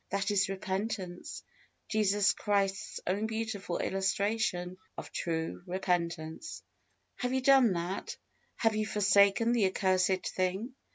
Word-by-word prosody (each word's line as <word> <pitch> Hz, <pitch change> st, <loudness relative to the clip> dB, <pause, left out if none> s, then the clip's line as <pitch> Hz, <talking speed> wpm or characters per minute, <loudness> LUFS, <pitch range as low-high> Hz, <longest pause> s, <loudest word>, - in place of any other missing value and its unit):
That 200 Hz, +1 st, 0 dB
is 200 Hz, -1 st, +2 dB
repentance 190 Hz, -1 st, -4 dB, 0.4 s
Jesus 205 Hz, -2 st, +3 dB
Christ's 200 Hz, 0 st, -1 dB
own 200 Hz, +4 st, 0 dB
beautiful 220 Hz, -5 st, -3 dB
illustration 195 Hz, -2 st, -1 dB, 0.2 s
of -, -, -7 dB
true 165 Hz, -1 st, -3 dB, 0.2 s
penitence. 170 Hz, -, -2 dB, 0.5 s
Have 250 Hz, 0 st, -2 dB
you 260 Hz, -, +1 dB
done 260 Hz, -5 st, +6 dB
that? 175 Hz, +2 st, -4 dB, 0.4 s
Have 225 Hz, -2 st, +1 dB
you 215 Hz, 0 st, 0 dB
forsaken 200 Hz, +2 st, +4 dB
the 230 Hz, -5 st, +3 dB
accursed 185 Hz, -1 st, +1 dB
thing? 190 Hz, +7 st, -2 dB
195 Hz, 115 wpm, -31 LUFS, 185-215 Hz, 0.5 s, done